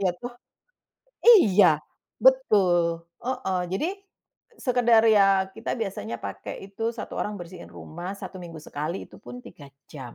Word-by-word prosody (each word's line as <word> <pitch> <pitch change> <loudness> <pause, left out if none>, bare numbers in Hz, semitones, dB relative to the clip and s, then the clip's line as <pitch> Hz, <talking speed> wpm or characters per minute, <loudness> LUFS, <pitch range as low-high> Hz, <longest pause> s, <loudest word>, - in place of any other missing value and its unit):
Iya 190 -2 +2
toh? 245 0 -7 1.0
Iya, 210 - +7 0.6
betul, 180 - +3 0.2
heeh. 250 -8 -2 0.2
Jadi 305 - -1 0.8
sekedar 240 -3 +4
ya 200 -1 +6 0.3
kita - - -5
biasanya 115 - -4
pakai 100 - -6 0.2
itu 215 +3 -9 0.2
1 - - -6
orang 210 - -3
bersihin 175 0 -10
rumah 175 +4 -8
1 195 - -9
minggu 165 -2 -9
sekali, 155 +5 -4
itu - - -14
pun 125 0 -9
3 145 - -13 0.3
jam. 130 -5 -9
190 Hz, 135 wpm, -25 LUFS, 165-225 Hz, 1.0 s, Iya